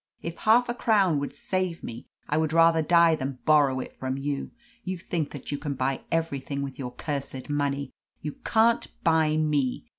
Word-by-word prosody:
If 170 0 -4
half 230 +3 +4
a 240 - -1
crown 200 -10 +3
would 140 0 -5
save 185 +1 -2
me, 115 +1 -7 0.2
I 150 - 0
would 155 0 +1
rather 165 0 +5
die 170 +1 +5
than 135 -3 -3
borrow 145 -4 +4
it - - -6
from 130 0 -2
you. 140 0 -3 0.3
You 185 -2 -3
think 170 -3 -3
that 145 -1 -8
you 145 - -2
can 145 -2 -3
buy 130 +1 -1
everything 140 -4 -1
with 135 -1 -7
your 125 -2 -5
cursed 140 -2 -5
money. 140 -2 -1 0.3
You 150 - -4
can't 230 +1 +3 0.2
buy 160 -2 +3
me. 150 -5 0
150 Hz, 185 wpm, -27 LUFS, 140-165 Hz, 0.3 s, rather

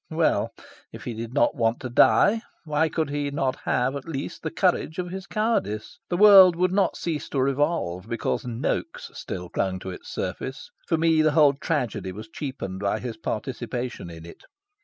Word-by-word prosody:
Well, - - +1 0.4
if - - -10
he 120 - -4
did 115 +1 -6
not 120 - +3
want 115 0 +1
to 130 - -4
die, 215 - +5 0.2
why 155 0 +1
could 155 -3 -1
he 145 0 -1
not 135 -2 -1
have, 130 +3 +1
at 140 +3 -6
least, 140 -4 -5
the - - -3
courage 160 - 0
of 180 -1 -3
his 190 0 -6
cowardice? 215 - -1
The 175 - 0
world 195 -3 +9
would 180 +1 +1
not 190 -1 +1
cease 160 -3 -3
to 140 - -1
revolve 130 - 0
because 115 -1 -1
Noaks 120 0 -3
still 90 0 -6
clung 95 +1 -1
to 95 - -5
its 90 - -10
surface. 135 +2 -5 0.2
For 165 - +2
me 160 -1 +3
the 155 -1 +3
whole 145 -2 +6
tragedy 125 - -2
was 110 +4 -9
cheapened 130 -9 -5
by 100 +2 0
his 120 -2 -5
participation 120 -1 -4
in 80 -1 -10
it. 85 - -12
135 Hz, 185 wpm, -25 LUFS, 110-165 Hz, 0.4 s, world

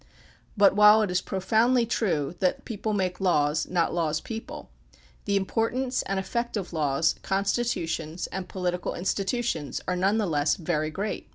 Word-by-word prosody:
But 200 -1 +5
while 210 +1 +7
it 200 - -1
is 180 0 +1
profoundly 225 +6 +2
true 175 -11 -1
that 185 - 0
people 215 -1 -3
make 185 -3 -1
laws, 150 -4 +2
not 175 -2 0
laws 160 -3 0
people, 225 -1 -8 0.5
the 200 - 0
importance 230 +6 0
and 195 0 -2
effect 235 +4 -2
of 185 -3 -5
laws, 150 0 +1
con 195 +1 0
stitutions, 170 -7 -2
and 185 -1 -5
political 180 -1 -2
institutions 190 - -2
are 180 - 0
none 195 +4 +2
the 215 - +1
less 150 -4 +1
very 155 -4 -1
great. 200 +6 -4
190 Hz, 160 wpm, -26 LUFS, 165-215 Hz, 0.5 s, while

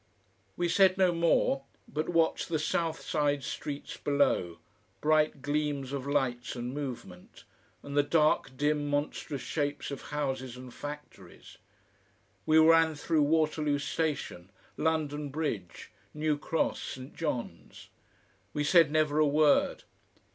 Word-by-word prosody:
We 175 - +1
said 190 +2 +4
no 185 -2 +4
more, 165 -5 +2 0.2
but 155 +2 -3
watched 165 -2 +1
the 165 - +1
south 160 +1 -1
side 145 -2 0
streets 145 +3 -5
below 135 -12 +1 0.4
bright 155 -2 +2
gleams 145 -2 -1
of 140 -1 -4
lights 130 -4 -1
and 120 +1 -4
movement, 125 -11 -7 0.4
and 140 - -7
the 145 - +6
dark, 150 -3 +1
dim, 145 0 0
monstrous 145 -1 -2
shapes 145 -2 -2
of 140 - -5
houses 130 -4 -3
and 125 -1 -10
factories. 145 -15 -10 0.9
We 155 - +5
ran 160 0 +6
through 155 +1 +1
Waterloo 150 -1 +2
Station, 140 - -3 0.3
London 150 -2 -1
Bridge, 135 - -4 0.2
New 150 0 +1
Cross, 155 +2 -1
St. 130 +1 -8
John's. 125 - -5 0.7
We 150 - 0
said 165 0 +5
never 155 -1 +2
a 155 - +5
word. 150 +1 +3
145 Hz, 125 wpm, -30 LUFS, 140-155 Hz, 0.9 s, the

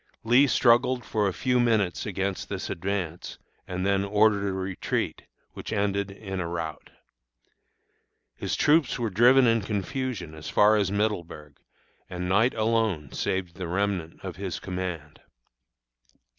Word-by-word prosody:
Lee 125 +5 +5
struggled 125 -1 +3
for 105 -2 0
a - - 0
few 125 +6 0
minutes 110 -7 +1
against 95 -1 -3
this - - -4
advance, 90 -2 -4 0.3
and 90 0 -3
then 100 0 +2
ordered 105 0 +3
a - - 0
retreat, 95 0 -3 0.3
which - - -7
ended 100 -1 0
in 95 -1 -6
a 90 - -2
rout. 80 -2 -5 1.5
His - - -3
troops 150 -3 +3
were 115 -4 -2
driven 125 +6 +6
in 115 -1 +3
confusion 105 - -3
as 80 0 -8
far 105 +1 +5
as 100 -3 +1
Middleburg, 85 -8 -3 0.5
and 90 -1 -4
night 110 +7 +3
alone 110 - 0
saved 90 -2 -3
the 90 -3 -4
remnant 90 -2 -2
of 95 -2 -6
his 95 -2 -4
command. 90 -5 -5
100 Hz, 140 wpm, -26 LUFS, 90-110 Hz, 1.5 s, driven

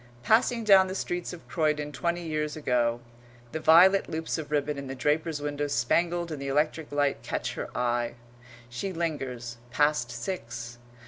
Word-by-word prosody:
Passing 230 - +3
down 195 -3 +7
the 185 - -4
streets 175 -2 -3
of 175 -2 -11
Croydon 150 -2 0
twenty 170 +3 -2
years 150 -1 -2
ago, 120 -4 +1 0.5
the 160 - -3
violet 175 +5 +6
loops 160 0 -2
of 150 -2 -6
ribbon 145 -1 0
in 140 - -6
the 135 - -5
draper's 150 +2 0
window 145 0 -2
spangled 170 +7 +1
in 150 - -4
the 140 - -5
electric 150 +2 0
light 145 -1 +1
catch - - -3
her - - -5
eye. 120 -1 0 0.5
She 120 +11 -4
lingers 130 -8 -3
past 145 -2 +2
six. 120 -3 -5
150 Hz, 165 wpm, -28 LUFS, 130-170 Hz, 0.5 s, down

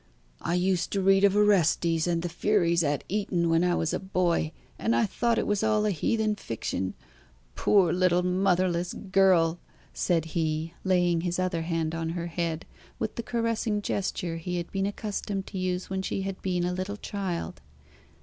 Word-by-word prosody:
"I 170 - -1
used 180 0 +1
to 200 - +1
read 195 +1 +5
of 200 -1 +5
Orestes 170 -5 +3
and 170 -1 0
the - - -1
Furies 175 -1 +2
at 145 -1 0
Eton 180 -4 0
when 165 +1 +3
I 180 -1 +2
was 165 - -1
a - - 0
boy, 180 -4 0 0.3
and 230 - +1
I 230 - +3
thought 235 +3 0
it - - +1
was 205 -1 0
all 215 -1 +2
a 210 - +2
heathen 215 +5 +1
fiction. 95 - -3 0.6
Poor 185 -5 +3
little 180 0 +3
motherless 180 -1 +1
girl!" 185 -4 +3 0.3
said 165 -3 +1
he, 160 0 -1
laying 175 -3 +2
his 175 0 -2
other 185 -2 0
hand 165 -1 -1
on 165 0 -2
her 170 - -3
head, 165 -1 -3 0.3
with - - -3
the - - -4
caressing 230 -2 -1
gesture 180 -4 -2
he 180 +2 -3
had 170 -1 -5
been 195 0 0
accustomed 200 -1 -3
to 190 - -6
use 185 0 -2
when 190 0 -1
she 190 0 -2
had 195 -1 -5
been 180 -2 0
a 180 +1 0
little 185 +3 -4
child. 185 - -4
180 Hz, 180 wpm, -27 LUFS, 170-195 Hz, 0.6 s, read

